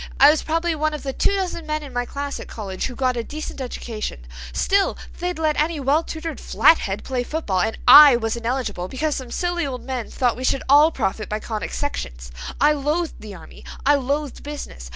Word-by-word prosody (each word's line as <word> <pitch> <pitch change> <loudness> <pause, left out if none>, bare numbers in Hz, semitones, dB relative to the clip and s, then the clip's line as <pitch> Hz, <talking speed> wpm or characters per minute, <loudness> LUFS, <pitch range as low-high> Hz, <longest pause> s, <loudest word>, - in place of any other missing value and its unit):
I 280 +2 +9
was 310 - 0
probably 330 +1 0
one 310 0 -1
of 300 - -8
the 270 -1 -3
two 400 - +1
dozen 360 -4 -3
men 305 0 -2
in 275 -3 -10
my 245 0 -1
class 280 +2 -5
at - - -8
college 195 -4 -4
who 250 - -8
got 255 -1 0
a 235 - -2
decent 300 +1 -7
education; 220 - -5 0.3
still 395 - +1 0.2
they'd 355 -1 -2
let 310 -2 +1
any 315 0 -1
well 280 +3 +2
tutored 325 0 -6
flathead 205 -11 +3
play 255 -2 -2
football 245 - -2
and 220 +3 -1
I 285 +1 +10
was 225 -1 -1
ineligible, 235 -6 -3
because 295 +7 -2
some 260 -2 -6
silly 350 +1 -1
old 255 -2 -6
men 255 -4 -4
thought 245 -3 0
we 255 - -7
should 265 +1 +1
all 295 +4 +6
profit 215 -6 -2
by 215 - -2
conic 215 -2 -5
sections. - - -5 0.3
I 295 - +5
loathed 300 +3 -1
the 210 -2 -9
army. 165 - -13 0.2
I 290 - +6
loathed 285 0 -1
business. 285 - -8
270 Hz, 210 wpm, -22 LUFS, 230-310 Hz, 0.3 s, I